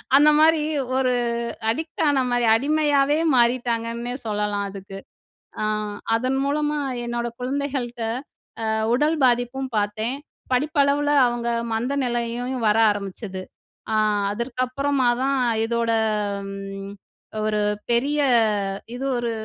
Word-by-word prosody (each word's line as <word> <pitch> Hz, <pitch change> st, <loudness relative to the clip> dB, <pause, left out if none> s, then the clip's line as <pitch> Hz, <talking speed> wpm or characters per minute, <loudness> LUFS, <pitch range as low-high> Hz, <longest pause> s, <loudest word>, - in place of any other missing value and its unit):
அந்தமாரி 300 Hz, +2 st, +5 dB, 0.3 s
ஒரு 255 Hz, -1 st, +2 dB, 0.6 s
அடிக்ட் 315 Hz, +7 st, -3 dB
ஆனமாரி 250 Hz, -4 st, +1 dB
அடிமையாவே 290 Hz, +1 st, +2 dB, 0.2 s
மாறிட்டாங்கன்னே 235 Hz, 0 st, 0 dB
சொல்லலாம் 210 Hz, -1 st, -1 dB
அதுக்கு. 195 Hz, 0 st, -9 dB, 0.6 s
அ -, -, +1 dB, 0.5 s
அதன் 255 Hz, +3 st, 0 dB
மூலமா 295 Hz, +1 st, 0 dB, 0.3 s
என்னோட 240 Hz, 0 st, -2 dB
குழந்தைகள்ட்ட 260 Hz, -2 st, -3 dB, 0.7 s
அ 220 Hz, -, +1 dB, 0.2 s
உடல் 300 Hz, +4 st, +2 dB
பாதிப்பும் 245 Hz, +2 st, 0 dB
பார்த்தேன். 215 Hz, +4 st, -1 dB, 0.4 s
படிப்பளவுல 290 Hz, +1 st, +2 dB, 0.2 s
அவுங்க 240 Hz, -1 st, -1 dB, 0.2 s
மந்தநிலையையும் 245 Hz, 0 st, -1 dB
வர 210 Hz, -, +3 dB
ஆரம்பிச்சது. 195 Hz, -1 st, -5 dB, 0.5 s
அ -, -, +2 dB, 0.4 s
அதற்கு 235 Hz, +3 st, -3 dB
அப்புறமா 275 Hz, 0 st, 0 dB, 0.2 s
தான் 275 Hz, 0 st, +1 dB, 0.3 s
இதோட 235 Hz, 0 st, 0 dB, 0.6 s
ம் 195 Hz, 0 st, -7 dB, 0.5 s
ஒரு 215 Hz, -1 st, +1 dB, 0.3 s
பெரிய 280 Hz, +5 st, +1 dB, 0.8 s
இது 270 Hz, -, -4 dB
ஒரு 235 Hz, -1 st, -1 dB
245 Hz, 100 wpm, -23 LUFS, 230-280 Hz, 0.8 s, அந்தமாரி